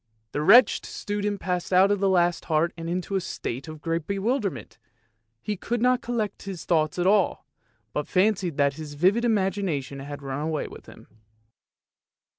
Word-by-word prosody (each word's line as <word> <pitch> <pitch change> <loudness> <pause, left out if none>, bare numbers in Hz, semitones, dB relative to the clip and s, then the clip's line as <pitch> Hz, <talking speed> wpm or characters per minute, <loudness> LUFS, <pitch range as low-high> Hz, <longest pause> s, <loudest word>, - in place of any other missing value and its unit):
The 145 - -2
wretched 225 +11 +6
student 205 -1 -3
passed 180 -1 -2
out 190 +2 +5
of 205 - +1
the 195 0 +2
last 175 -2 +2
heart 160 +1 +1
in 165 0 -6
a 185 +2 -1
state 135 -6 -5
of 155 -1 -9
great 165 -1 -2
bewilderment, 200 - -2 0.6
he 210 - -2
could 235 +5 -3
not 250 +1 +3
collect 220 -4 -3
his 190 -4 -7
thoughts 155 -2 +1
at 175 - 0
all, 200 -1 +2 0.5
but 150 - -2
fancied 185 -4 +1
that 140 -1 +3
his 150 0 -8
vivid 190 +10 +3
imagination 190 - 0
had 145 +1 -8
run 135 +1 -4
away 155 0 -2
with - - -13
him. - - -14
180 Hz, 165 wpm, -25 LUFS, 155-205 Hz, 0.6 s, wretched